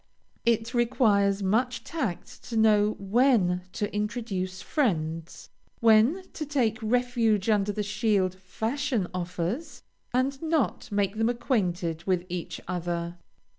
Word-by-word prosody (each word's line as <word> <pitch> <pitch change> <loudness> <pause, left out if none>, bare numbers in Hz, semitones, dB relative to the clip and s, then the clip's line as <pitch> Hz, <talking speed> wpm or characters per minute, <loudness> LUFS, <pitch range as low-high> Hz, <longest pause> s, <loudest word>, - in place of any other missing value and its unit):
It 230 +1 +2
requires 210 -5 +2
much 240 +6 +1
tact 265 - -4
to 230 - -3
know 215 -1 +4
when 200 -3 +3
to 205 0 -3
introduce 210 -4 -2
friends, 165 - -2 0.3
when 230 - +5
to 310 - -4
take 250 -7 0
refuge 230 -3 +2
under 205 -1 +2
the 210 +1 -2
shield 205 -2 +1
fashion 220 +5 -2
offers, 180 - -4 0.3
and 265 +2 0
not 320 -7 0
make 200 0 0
them 225 +1 +2
acquainted 180 - -1
with 180 -2 +1
each 175 -1 -4
other. 175 -1 -3
210 Hz, 120 wpm, -27 LUFS, 185-245 Hz, 0.3 s, when